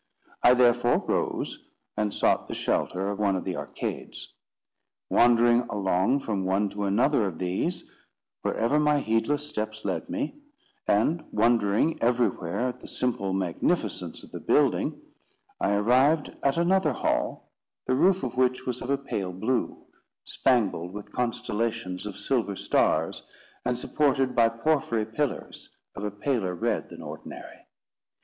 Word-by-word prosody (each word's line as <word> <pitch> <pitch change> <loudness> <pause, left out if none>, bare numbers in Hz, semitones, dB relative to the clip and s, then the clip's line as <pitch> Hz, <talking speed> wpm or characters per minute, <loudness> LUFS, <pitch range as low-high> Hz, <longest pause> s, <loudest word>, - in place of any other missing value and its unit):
I 125 - +7
therefore 120 -1 +4
rose, - - -1 0.4
and 105 -1 0
sought - - +1
the - - -5
shelter 95 +2 -1
of 100 - -5
one 100 -2 +2
of 95 - -2
the - - -3
arcades. - - -6 0.8
Wandering 120 0 +5
along 100 +5 +1
from 100 -6 -2
one 95 +2 +1
to 100 0 -3
another 110 +3 +2
of 85 -4 -5
these, 95 - -2 0.5
wherever 120 +7 +1
my 150 0 +3
heedless 140 +5 0
steps 110 -6 -5
led 275 - -2
me, 285 +1 -3 0.5
and 150 +11 +2
wondering 115 +5 +2
everywhere 120 -7 +1
at 125 0 -7
the - - -11
simple 115 -6 -1
magnificence 95 -3 -1
of - - -14
the - - -6
building, - - +2 0.6
I 100 - +1
arrived 130 +9 +3
at 140 +2 +1
another 170 -3 +3
hall, - - -2 0.3
the - - +1
roof 185 +8 +3
of 125 -1 -3
which 130 0 +1
was 125 -1 -3
of 125 - -6
a 140 - +2
pale 100 -9 -4
blue, 110 +7 -2 0.4
spangled 100 -8 +1
with 105 0 -8
constellations 115 -5 -2
of 100 - -7
silver 115 -7 -1
stars, - - +1 0.4
and 125 0 0
supported 135 -1 +1
by 115 -2 +4
porphyry 115 -2 0
pillars 120 +6 -4 0.2
of 100 - -7
a 105 - -1
paler 105 -3 -1
red - - -1
than - - -10
ordinary. - - -10
115 Hz, 140 wpm, -27 LUFS, 100-135 Hz, 0.8 s, I